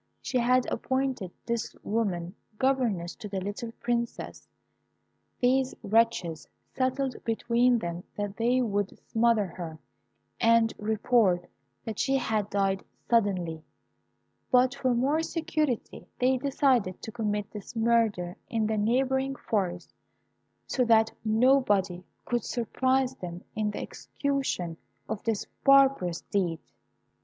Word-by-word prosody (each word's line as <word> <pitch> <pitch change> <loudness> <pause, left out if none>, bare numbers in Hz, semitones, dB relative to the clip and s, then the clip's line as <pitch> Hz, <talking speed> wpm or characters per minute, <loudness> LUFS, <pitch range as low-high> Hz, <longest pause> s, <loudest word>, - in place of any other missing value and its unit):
She 255 - -1
had 250 +1 +3
appointed 260 -5 -1 0.2
this 235 -1 -2
woman 190 -6 -1 0.2
governess 235 -10 +1
to 215 -4 -7
the 195 -1 -2
little 205 +4 -5
Princess. 235 0 -3 0.9
These 260 +1 +2
wretches 210 -7 +1 0.3
settled 260 0 0
between 235 +2 +2
them 175 -4 -4
that 205 -1 -3
they 245 +3 +2
would 205 -3 -1
smother 225 -2 +3
her, 170 -3 -7 0.6
and 230 -1 +4
report 210 -3 +2 0.4
that 220 -2 -5
she 270 0 +2
had 215 -5 -1
died 195 -1 0 0.3
suddenly; 180 -8 +1 0.9
but 250 +1 +4
for 260 -3 0
more 280 +6 +2
security 315 -6 -2
they 255 +1 +3
decided 255 -7 +1
to 220 - -5
commit 210 -3 -2
this 210 +2 -9
murder 225 -6 +2
in 225 -3 0
the 215 0 0
neighbouring 265 +4 +1
forest, 180 -8 -2 0.7
so 255 - +1
that 225 -1 +4
nobody 215 -6 +3 0.2
could 240 -2 -1
surprise 260 +2 0
them 175 -1 -7
in 215 -1 0
the 205 - -5
execution 270 - -3 0.3
of 220 -1 -3
this 225 -3 0 0.2
barbarous 270 -11 +5
deed. 180 -5 -1
225 Hz, 120 wpm, -28 LUFS, 200-255 Hz, 0.9 s, barbarous